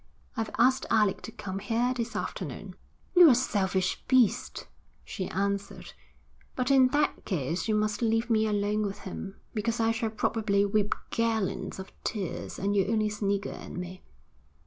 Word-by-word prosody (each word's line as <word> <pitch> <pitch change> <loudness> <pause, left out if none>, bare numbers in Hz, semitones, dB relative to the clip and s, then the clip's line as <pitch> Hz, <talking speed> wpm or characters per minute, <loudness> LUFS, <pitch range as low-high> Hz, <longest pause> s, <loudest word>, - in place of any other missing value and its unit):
'I've 225 -1 -2
asked 260 +3 +3
Alec 210 -3 +3
to - - -8
come 195 -4 -5
here 235 +5 0
this 235 -1 -3
afternoon.' - - -5 0.4
'You're 355 -2 +9
a 250 - +6
selfish 190 -6 0
beast,' 255 -5 +2 0.4
she 190 -4 -4
answered. 200 +1 -3 0.6
'But 255 +1 0
in 265 -2 +7
that 290 +3 0
case 170 - -2
you 215 - +2
must 210 +1 0
leave 225 0 +1
me 220 -2 +2
alone 210 0 0
with 200 - -7
him, 195 +1 -7 0.2
because 225 +1 -1
I 225 0 +3
shall 225 0 -1
probably 215 -2 +1
weep 205 0 +1 0.2
gallons 220 -4 -1
of 190 0 -8
tears, 200 -6 -4
and 200 +1 0
you'll 195 -1 +2
only 215 -1 +2
snigger 200 -1 -1
at - - -9
me.' 180 +1 -6
215 Hz, 160 wpm, -28 LUFS, 200-230 Hz, 0.6 s, You're